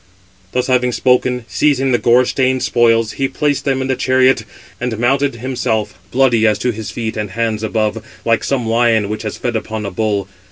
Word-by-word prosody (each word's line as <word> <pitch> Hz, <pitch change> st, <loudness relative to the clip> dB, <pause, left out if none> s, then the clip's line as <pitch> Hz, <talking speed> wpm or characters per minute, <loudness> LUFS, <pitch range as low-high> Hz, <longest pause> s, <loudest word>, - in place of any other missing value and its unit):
Thus 125 Hz, 0 st, 0 dB
having 125 Hz, -1 st, +2 dB
spoken, 125 Hz, -1 st, +1 dB
seizing 135 Hz, -3 st, +1 dB
the 120 Hz, -, +2 dB
gore 120 Hz, +3 st, +4 dB
stained 130 Hz, 0 st, 0 dB
spoils, 115 Hz, -2 st, +2 dB
he 135 Hz, -, -1 dB
placed 145 Hz, 0 st, -1 dB
them 135 Hz, -2 st, 0 dB
in -, -, -3 dB
the 130 Hz, -, 0 dB
chariot, 130 Hz, +1 st, +2 dB, 0.3 s
and 120 Hz, -2 st, -3 dB
mounted 135 Hz, +3 st, +1 dB
himself, 115 Hz, -4 st, -2 dB
bloody 120 Hz, -4 st, +3 dB
as 105 Hz, -1 st, +2 dB
to 125 Hz, +4 st, 0 dB
his 110 Hz, -2 st, -6 dB
feet 110 Hz, +3 st, -4 dB
and 105 Hz, -1 st, -3 dB
hands 110 Hz, +1 st, -2 dB
above, 110 Hz, 0 st, -1 dB, 0.2 s
like 115 Hz, -1 st, +2 dB
some 130 Hz, -4 st, -1 dB
lion 115 Hz, -2 st, +2 dB
which 110 Hz, 0 st, -4 dB
has 105 Hz, -2 st, -5 dB
fed 120 Hz, -1 st, -3 dB
upon 110 Hz, -1 st, -3 dB
a 100 Hz, -, -4 dB
bull. 100 Hz, 0 st, -1 dB
120 Hz, 195 wpm, -17 LUFS, 110-130 Hz, 0.3 s, gore